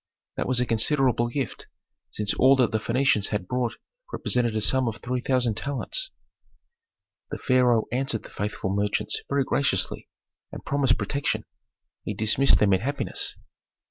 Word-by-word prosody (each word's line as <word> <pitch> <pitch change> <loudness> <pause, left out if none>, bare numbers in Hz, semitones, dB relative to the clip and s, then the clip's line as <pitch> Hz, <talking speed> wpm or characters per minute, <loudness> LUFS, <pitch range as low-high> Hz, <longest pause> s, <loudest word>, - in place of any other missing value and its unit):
That - - -2
was 130 -1 +2
a 125 - +2
considerable 120 +1 +2
gift, 125 -2 -4 0.4
since 105 -1 -1
all 135 +2 +5
that 125 -3 +2
the 110 - 0
Phœnicians 115 -2 +1
had 105 -4 -3
brought 125 0 -1 0.4
represented 120 -3 0
a 110 - 0
sum 130 +3 +1
of 110 -2 -3
three 125 0 -3
thousand 125 -5 +1
talents. 145 - -3 1.2
The - - -4
pharaoh 125 -3 +3
answered 125 -2 -1
the - - -13
faithful 105 -2 -3
merchants 100 +1 -1
very 140 0 +2
graciously, 130 -9 -1 0.4
and - - -9
promised 135 -3 +2
protection. 125 +7 -2 0.6
He 105 - -4
dismissed 110 +6 +3
them 100 -2 +3
in 95 - +2
happiness. 140 +5 -2
120 Hz, 150 wpm, -25 LUFS, 110-135 Hz, 1.2 s, all